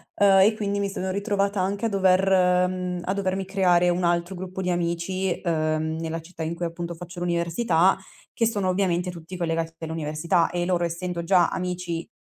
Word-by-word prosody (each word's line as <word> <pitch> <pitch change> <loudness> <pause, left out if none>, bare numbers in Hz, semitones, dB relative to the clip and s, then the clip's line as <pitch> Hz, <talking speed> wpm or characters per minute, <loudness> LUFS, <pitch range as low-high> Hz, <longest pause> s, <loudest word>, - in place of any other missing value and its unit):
ehm, 195 -1 +5
e 210 +3 +5
quindi 205 -1 -2
mi 200 0 -1
sono 190 -1 -3
ritrovata 200 0 0
anche 200 +3 -1
a - - +2
dover 185 -2 +3
mhmm, 180 -1 -3
a 190 - 0
dovermi 190 -1 -1
creare 180 -2 +3
un 175 +1 0
altro 175 +2 0
gruppo 185 +1 -6
di 180 - -1
amici, 175 +2 -1
uhm, 160 -2 0
nella 165 0 -3
città 165 0 -8
in 160 +1 -3
cui 175 - -3
appunto 170 +1 -4
faccio 175 +2 -9
l'università, 170 +1 +2 0.4
che 230 - +1
sono 205 -4 -1
ovviamente 180 -1 0
tutti 170 +1 -9
collegati 165 -1 -1
all'università 160 +1 0
e 175 0 -2
loro, 175 -1 +1
essendo 170 0 -3
già 175 0 +4
amici, 180 -2 -3
180 Hz, 180 wpm, -25 LUFS, 170-190 Hz, 0.4 s, ehm